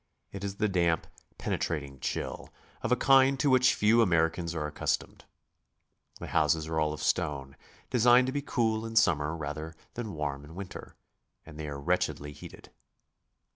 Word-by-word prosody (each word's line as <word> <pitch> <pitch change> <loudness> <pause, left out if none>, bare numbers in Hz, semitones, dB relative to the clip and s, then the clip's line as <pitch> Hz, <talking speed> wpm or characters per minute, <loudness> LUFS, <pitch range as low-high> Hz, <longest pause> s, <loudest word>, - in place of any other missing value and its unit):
It 100 0 -7
is 100 0 -3
the 105 - +1
damp, 85 -4 +1 0.3
penetrating 70 -5 -3
chill, - - -4 0.3
of 115 - -2
a - - +6
kind 135 +1 +5
to 145 -1 +3
which 130 0 +5
few 110 +3 +4
Americans 85 -3 +1
are 80 -2 -2
accustomed. 75 - -3 0.9
The - - -6
houses 80 0 +2
are 80 0 -2
all 75 -1 +1
of 75 - -6
stone, 70 -2 -1 0.4
designed 125 +1 +5
to 130 - -2
be 145 - -1
cool 110 -5 0
in 115 0 -6
summer 80 -7 +3
rather 75 +1 -5 0.2
than 110 -7 -5
warm 75 -2 -3
in 75 +3 -12
winter, 100 0 -8 0.5
and 75 0 -11
they 75 - -4
are 70 -1 -5
wretchedly 70 +1 -1
heated. - - -12
85 Hz, 165 wpm, -29 LUFS, 75-115 Hz, 0.9 s, a